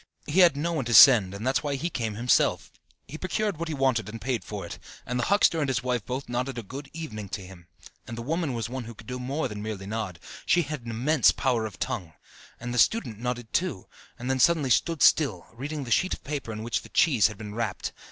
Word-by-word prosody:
He 155 Hz, +6 st, +1 dB
had 170 Hz, -6 st, +6 dB
no 170 Hz, +4 st, -1 dB
one 145 Hz, -6 st, -1 dB
to 120 Hz, -1 st, +1 dB
send, 110 Hz, -9 st, +9 dB
and 105 Hz, +4 st, -6 dB
that's 130 Hz, +1 st, +2 dB
why 145 Hz, -2 st, -2 dB
he 170 Hz, +6 st, -3 dB
came 110 Hz, -3 st, -3 dB
himself. 120 Hz, +3 st, +2 dB, 0.4 s
He 155 Hz, -, -8 dB
procured 205 Hz, 0 st, -1 dB
what 170 Hz, +1 st, -4 dB
he 160 Hz, -, -3 dB
wanted 130 Hz, -6 st, +1 dB
and 115 Hz, +2 st, -7 dB
paid 125 Hz, -1 st, -2 dB
for 105 Hz, -4 st, -6 dB
it, -, -, -8 dB, 0.3 s
and 125 Hz, 0 st, -2 dB
the 120 Hz, -, 0 dB
huckster 200 Hz, -4 st, +3 dB
and 145 Hz, -, 0 dB
his 130 Hz, -4 st, -1 dB
wife 125 Hz, -3 st, -1 dB
both 130 Hz, +2 st, -4 dB
nodded 125 Hz, +1 st, -3 dB
a 120 Hz, -, -4 dB
"good 135 Hz, +7 st, -8 dB
evening" 110 Hz, -11 st, -7 dB
to 95 Hz, -1 st, -5 dB
him; 90 Hz, -2 st, -14 dB, 0.4 s
and 115 Hz, -, -7 dB
the 115 Hz, -, -5 dB
woman 160 Hz, +1 st, -1 dB
was 115 Hz, -1 st, -3 dB
one 125 Hz, 0 st, -5 dB
who 115 Hz, 0 st, -9 dB
could 110 Hz, -, -14 dB
do 125 Hz, +2 st, -5 dB
more 135 Hz, +4 st, -2 dB
than 105 Hz, -3 st, -7 dB
merely 105 Hz, -2 st, -5 dB
nod 105 Hz, -4 st, -4 dB, 0.3 s
she 175 Hz, -, +3 dB
had 150 Hz, -5 st, -6 dB
an -, -, -4 dB
immense 130 Hz, +5 st, +3 dB
power 120 Hz, -5 st, 0 dB
of 105 Hz, -, -12 dB
tongue! 85 Hz, -3 st, -4 dB, 0.5 s
And 120 Hz, 0 st, -5 dB
the 125 Hz, -, 0 dB
student 120 Hz, -, +2 dB
nodded 120 Hz, -1 st, -4 dB
too, 175 Hz, -, -1 dB, 0.3 s
and 120 Hz, -, -6 dB
then 130 Hz, 0 st, 0 dB
suddenly 155 Hz, -4 st, +3 dB
stood 165 Hz, +3 st, +2 dB
still, 115 Hz, -, +4 dB
reading 145 Hz, +5 st, -5 dB
the 120 Hz, -, -7 dB
sheet 185 Hz, -, +2 dB
of -, -, -19 dB
paper 140 Hz, -5 st, -4 dB
in 110 Hz, 0 st, -6 dB
which 115 Hz, 0 st, -1 dB
the -, -, -14 dB
cheese 130 Hz, -10 st, +4 dB
had 105 Hz, -2 st, -8 dB
been 105 Hz, -1 st, -8 dB
wrapped. 110 Hz, -3 st, -3 dB
125 Hz, 250 wpm, -27 LUFS, 110-145 Hz, 0.5 s, send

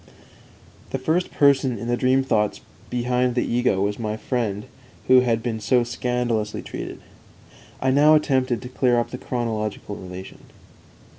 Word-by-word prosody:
The -, -, -2 dB
first 160 Hz, +7 st, 0 dB
person 135 Hz, -3 st, +3 dB
in 115 Hz, -, -6 dB
the 120 Hz, -, +1 dB
dream 130 Hz, +2 st, +2 dB
thoughts 105 Hz, -5 st, 0 dB, 0.3 s
behind 125 Hz, 0 st, 0 dB
the 125 Hz, -, +1 dB
ego 120 Hz, -5 st, +1 dB
was 100 Hz, +2 st, -1 dB
my 110 Hz, -1 st, -2 dB
friend 110 Hz, -4 st, -2 dB, 0.4 s
who 130 Hz, 0 st, +7 dB
had 115 Hz, -3 st, +1 dB
been 115 Hz, -2 st, -2 dB
so 120 Hz, +3 st, +2 dB
scandalously 120 Hz, -3 st, -2 dB
treated. -, -, -6 dB, 0.8 s
_"I 130 Hz, -, +1 dB
now 150 Hz, +3 st, +6 dB
attempted 130 Hz, -6 st, +1 dB
to -, -, -6 dB
clear 125 Hz, -1 st, +2 dB
up 120 Hz, -, -3 dB
the 125 Hz, -, -6 dB
chronological 110 Hz, -4 st, -3 dB
relation." 90 Hz, 0 st, -9 dB
120 Hz, 150 wpm, -23 LUFS, 110-130 Hz, 0.8 s, who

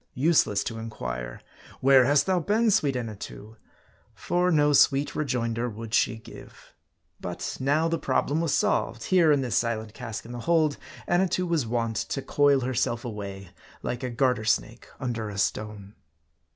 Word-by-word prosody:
Useless 130 Hz, -8 st, +2 dB
to 115 Hz, -1 st, -5 dB
inquire, -, -, -6 dB, 0.4 s
"Where 135 Hz, -1 st, +6 dB
hast 140 Hz, +2 st, +3 dB
thou 185 Hz, -1 st, +2 dB
been, 215 Hz, +6 st, +2 dB
sweet 145 Hz, -10 st, +2 dB
Anna 115 Hz, -4 st, -4 dB
too?" 105 Hz, +2 st, -10 dB, 0.6 s
For 180 Hz, +1 st, 0 dB
no 150 Hz, -3 st, +3 dB
sweet 140 Hz, +1 st, +4 dB
rejoinder 120 Hz, -4 st, -1 dB
would 115 Hz, 0 st, -8 dB
she 115 Hz, -, +2 dB
give. 110 Hz, -, -14 dB, 0.5 s
But -, -, -5 dB
now 145 Hz, +5 st, +2 dB
the 165 Hz, 0 st, -1 dB
problem 145 Hz, +4 st, 0 dB
was 165 Hz, -3 st, 0 dB
solved. 115 Hz, -3 st, 0 dB
Here, 175 Hz, -4 st, +4 dB
in 145 Hz, -2 st, +3 dB
this 125 Hz, -3 st, -2 dB
silent 110 Hz, -2 st, -1 dB
cask 115 Hz, -4 st, -7 dB
in 120 Hz, -, -9 dB
the 120 Hz, -, -6 dB
hold, 155 Hz, +1 st, +2 dB, 0.3 s
Annatoo 180 Hz, +1 st, +1 dB
was 165 Hz, -8 st, 0 dB
wont 115 Hz, -1 st, -1 dB
to 135 Hz, -, -3 dB
coil 145 Hz, -2 st, +3 dB
herself 120 Hz, -1 st, -1 dB
away, 100 Hz, -4 st, -6 dB, 0.3 s
like 120 Hz, +1 st, -3 dB
a 130 Hz, -, -3 dB
garter 125 Hz, -1 st, +1 dB
snake 110 Hz, -, -1 dB
under 115 Hz, -4 st, -3 dB
a 100 Hz, -, -7 dB
stone. 105 Hz, 0 st, -3 dB
125 Hz, 165 wpm, -26 LUFS, 110-150 Hz, 0.6 s, Where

